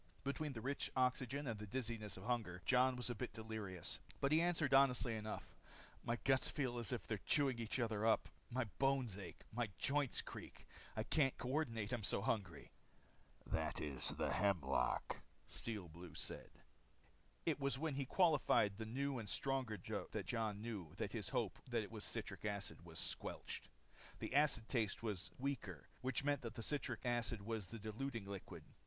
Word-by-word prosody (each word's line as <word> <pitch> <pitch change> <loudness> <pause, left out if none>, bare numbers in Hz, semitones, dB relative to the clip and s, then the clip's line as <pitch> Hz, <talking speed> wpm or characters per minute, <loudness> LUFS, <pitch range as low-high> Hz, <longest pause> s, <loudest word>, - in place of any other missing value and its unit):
Between 140 +2 -1
the 115 - -5
rich 140 +4 0
oxygen 130 +2 +2
and 115 -5 -2
the 105 - -5
dizziness 115 -3 -3
of 95 - -8
hunger, 110 -7 -1
Jon 130 0 +5
was 125 0 0
a - - 0
bit 110 - -4
delirious. 110 -5 -4 0.2
But 140 - +2
he 155 +1 +6
answered 165 -5 +2
honestly 130 -3 +6
enough: 110 0 -5 0.5
"My 115 - +1
guts 135 -1 +4
feel 125 -5 0
as 115 - 0
if 125 - -2
they're 110 -3 -1
chewing 135 -5 +4
each 115 +3 -1
other 110 -3 +1
up. 110 0 +4 0.2
My 130 +1 +1 0.2
bones 135 -6 +3
ache. 95 -4 -7
My 120 -1 0
joints 140 -2 +2
creak. - - -8 0.3
I 110 - +2
can't 135 +2 +3
coordinate 125 -5 0
I'm 120 -4 -1
so 100 - +3
hungry." 95 -9 -1 0.7
"That - - 0
is 70 -4 +2
the - - 0
hemlock," 85 -10 +2 0.2
Steel 105 -6 -3
Blue 85 0 -10
said. - - -2 1.0
It 160 -3 +2
was 140 -1 +1
when 155 +1 0
he 135 -1 -1
quaffed 145 - +4
the 110 - -3
new 135 +2 0
and 105 -3 -4
stronger 130 -5 +1
draught 90 - -4
that - - -1
Jon 110 -3 -1
knew 100 -9 -4
that - - -2
his - - -2
hope - - 0
that - - +2
it - - -8
was - - -4
citric - - -4
acid 100 -4 -3
was 80 -1 -7
squelched. - - -2 0.5
The - - -4
acid 145 -6 +5
taste 115 -4 +1
was 105 -6 -2
weaker 125 - -3
which 130 +1 0
meant 145 -1 +2
that 115 -2 -5
the 115 - -4
citric 145 +1 -1
acid 120 -3 0
was 110 -3 -2
the 115 - -6
diluting 110 +2 -3
liquid. 100 -1 -6
115 Hz, 180 wpm, -41 LUFS, 105-135 Hz, 1.0 s, he